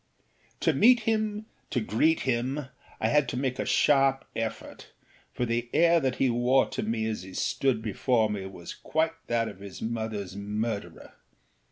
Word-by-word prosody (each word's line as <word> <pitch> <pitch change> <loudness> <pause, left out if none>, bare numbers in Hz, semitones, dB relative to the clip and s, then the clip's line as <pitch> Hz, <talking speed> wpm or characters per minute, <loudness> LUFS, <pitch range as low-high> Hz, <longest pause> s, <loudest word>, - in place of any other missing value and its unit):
To - - +3
meet 245 +1 +6
him, 215 -1 -1 0.2
to - - 0
greet 120 +9 +2
him, 130 +3 -1 0.3
I - - +1
had 150 -4 +3
to 125 - -3
make 130 -1 -1
a - - -1
sharp 135 -2 +3
effort; 115 0 -5 0.4
for 125 - -2
the 120 0 -1
air 170 0 +5
that 130 -4 0
he 135 - +2
wore 125 +2 +3
to - - -3
me 110 +1 -1
as 110 -1 -2
he 95 0 -10
stood 125 -3 0
before 115 +1 +1
me 100 -2 -4
was 85 -3 -9
quite 160 +1 -1
that 115 -1 +1
of - - -9
his 100 -1 -9
motherâs 110 -4 -4
murderer. 105 +1 -4
120 Hz, 170 wpm, -28 LUFS, 110-135 Hz, 0.4 s, meet